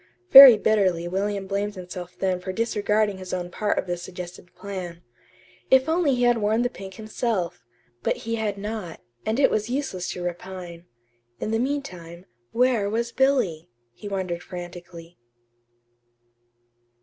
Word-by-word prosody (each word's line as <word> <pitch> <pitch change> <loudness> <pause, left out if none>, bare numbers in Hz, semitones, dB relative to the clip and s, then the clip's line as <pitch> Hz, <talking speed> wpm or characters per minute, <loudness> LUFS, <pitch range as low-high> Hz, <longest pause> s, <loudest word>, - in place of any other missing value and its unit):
Very 265 -4 +12
bitterly 190 -6 +1
William 195 +2 -2
blamed 200 +1 -2
himself 180 -1 -8
then 185 -1 0
for 185 +1 -5
disregarding 210 -1 0
his 185 0 -5
own 175 -1 -5
part 210 +2 -1
of - - -1
the 175 -1 -2
suggested 180 0 -9
plan. 180 -4 -7 0.7
If 265 +1 +5
only 320 -4 +2
he 245 - 0
had 240 -1 +3
worn 215 +3 +1
the 245 - -1
pink 190 -4 -10
himself! 215 -5 -3 0.4
but - - 0
he 230 - -2
had 215 -3 -2
not; 205 -4 -6 0.3
and 220 +4 0
it 280 - +4
was 215 +1 -1
useless 245 -9 -3
to 180 - -6
repine. 175 -1 -7 0.5
In 215 - -3
the 225 - +1
meantime, 185 -11 -4 0.3
where 240 -4 +2
was 235 +2 -2
Billy, 240 - +1 0.2
he 205 - -10
wondered 185 -3 -3
frantically. 175 -2 -10
200 Hz, 150 wpm, -24 LUFS, 180-225 Hz, 0.7 s, Very